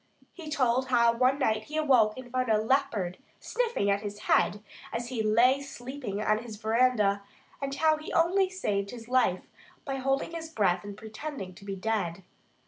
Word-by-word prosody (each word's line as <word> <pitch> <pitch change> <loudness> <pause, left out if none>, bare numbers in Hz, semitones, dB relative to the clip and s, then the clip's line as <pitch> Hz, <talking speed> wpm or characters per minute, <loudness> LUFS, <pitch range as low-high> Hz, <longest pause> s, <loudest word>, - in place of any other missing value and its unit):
He 330 -4 -9
told 260 -2 +1
how 235 -2 +4
one 255 +3 +2
night 220 -5 0
he 310 - -5
awoke 255 -8 +4
and 250 -1 -9
found 255 -1 0
a 220 - +4
leopard 220 -6 0 0.2
sniffing 475 - -1
at 200 0 +1
his 205 -1 -6
head 205 0 +2 0.3
as 240 +1 -3
he 245 -4 -2
lay 235 +6 +4
sleeping 260 -5 -6
on 215 0 +2
his 225 -2 -8
veranda; 220 -2 +2 0.4
and 275 0 -3
how 310 +2 +3
he 310 - -8
only 370 +3 +3
saved 200 - -2
his 230 0 -9
life 250 -8 +2 0.4
by 270 -2 -2
holding 270 +3 0
his 330 -1 -6
breath 205 - +1
and 205 0 -8
pretending 220 -2 -7
to 200 +3 -14
be 195 -1 -4
dead. 195 -3 -2
240 Hz, 180 wpm, -29 LUFS, 210-275 Hz, 0.4 s, how